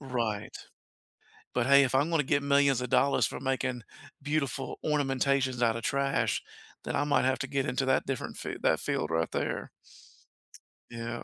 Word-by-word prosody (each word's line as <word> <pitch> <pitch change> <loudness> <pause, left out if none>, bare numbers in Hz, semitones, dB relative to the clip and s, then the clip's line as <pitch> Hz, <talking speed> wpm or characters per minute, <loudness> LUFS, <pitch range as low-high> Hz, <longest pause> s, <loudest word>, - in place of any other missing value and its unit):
right. 120 -6 -3 1.0
But, 120 -1 +1
hey, 140 +1 +7
if 130 - -2
I'm 140 +5 +2
gonna 165 -3 +2
get 140 +1 +1
millions 140 -2 +3
of 125 - -4
dollars 140 0 +3
for - - -6
making 130 -2 -2 0.4
beautiful 140 -2 -2
ornamentations 135 -3 +1
out 115 -1 +3
of 115 - -5
trash, 135 -6 0 0.4
then - - -4
I 145 - +2
might 145 - +2
have 130 0 +1
to 135 - -2
get 140 -1 -1
into 135 -1 -1
that 130 0 +2
different 135 -2 -4
fi - - -5
that - - +2
field 75 - -2
right 80 0 0
there. - - -2 1.2
Yeah. 115 0 -5
135 Hz, 170 wpm, -29 LUFS, 120-140 Hz, 1.2 s, hey